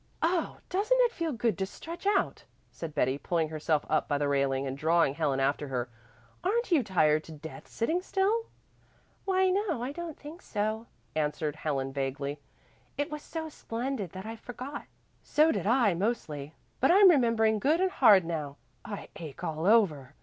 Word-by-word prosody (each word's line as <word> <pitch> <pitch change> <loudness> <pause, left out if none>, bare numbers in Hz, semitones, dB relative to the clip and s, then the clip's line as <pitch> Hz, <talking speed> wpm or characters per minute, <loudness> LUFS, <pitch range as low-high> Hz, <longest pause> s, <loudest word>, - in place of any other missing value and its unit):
"Oh, 335 +1 +1
doesn't 425 +7 +2
it 485 -2 +4
feel 335 -7 -2
good 235 -3 0
to 190 - 0
stretch 335 - -7
out," 405 -1 +1 0.3
said 160 -2 -7
Betty, 135 -1 +1
pulling 165 -1 0
herself 155 -1 0
up - - +1
by 145 - +1
the 145 0 0
railing 140 -1 +1
and 135 0 -3
drawing 160 0 +3
Helen 145 -3 0
after 140 +2 0
her. 125 -2 -3 0.5
"Aren't 440 +4 0
you 320 -5 +5
tired 155 -7 +2
to - - -11
death 160 +1 -10
sitting 320 +10 -1
still?" 405 +5 0 0.8
"Why 375 -1 +3
no, 370 - 0
I 255 - -2
don't 335 0 -6
think 310 +5 -10
so," 215 +2 -2 0.3
answered 150 0 -1
Helen 135 -4 -2
vaguely. 140 +1 -3 0.6
"It 290 +2 -2
was 300 0 -5
so 320 +1 -5
splendid 240 - -4
that 190 +1 -7
I 225 +1 -6
forgot." 255 +5 -7 0.4
"So 310 +2 +3
did 255 - -2
I 235 -4 +4
mostly, 160 -7 -3 0.2
but 270 - +3
I'm 390 +2 +8
remembering 230 -6 +3
good 300 +8 +2
and 375 0 +2
hard 205 - +6
now. 150 -4 -4 0.3
I 205 - -7
ache 155 -5 -9
all 160 +2 -2
over." 155 - +3
210 Hz, 175 wpm, -29 LUFS, -, 0.8 s, I'm